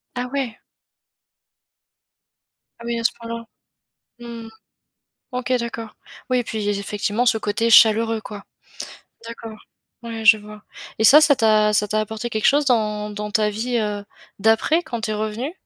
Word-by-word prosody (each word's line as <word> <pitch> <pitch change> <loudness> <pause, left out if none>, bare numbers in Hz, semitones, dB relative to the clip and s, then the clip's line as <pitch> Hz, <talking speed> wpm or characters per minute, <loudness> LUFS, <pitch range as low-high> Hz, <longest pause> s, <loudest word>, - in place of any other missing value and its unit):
Ah 250 0 -3
ouais! 260 -5 -3 2.2
Ah 235 - -11
oui, 235 0 -2
à - - -5
ce - - +3
point-là. 230 0 -7 0.7
Mmh 235 -1 -9
mh. - - -11 0.8
OK, 250 0 -4
d'accord. 230 -2 -6 0.4
Oui, 250 - +3
et - - -2
puis, 215 -2 -4
effectivement, 205 +3 -2
ce 230 -2 +3
côté 220 +2 -1
chaleureux, 225 0 +5
quoi. 205 -2 -9 0.8
D'accord, 225 -2 -9 0.5
ouais, 225 -1 -6
je 225 -1 +7
vois. 210 0 -12 0.4
Et - - +2
ça, 295 +7 +9
ça 290 -2 +5
t'a 215 -3 +3
ça 210 0 +1
t'a 215 +1 0
apporté 220 +2 -5
quelque 215 -1 0
chose, 290 +1 +3
dans 210 -4 0
dans 210 0 -6
ta 210 0 +2
vie, 235 +3 -2
heu, 210 -2 -3 0.3
d'après, 225 - +2
quand 240 -7 -5
tu 215 - -3
es 215 - -1
revenue? 220 +8 -3
225 Hz, 160 wpm, -21 LUFS, 210-235 Hz, 2.2 s, ça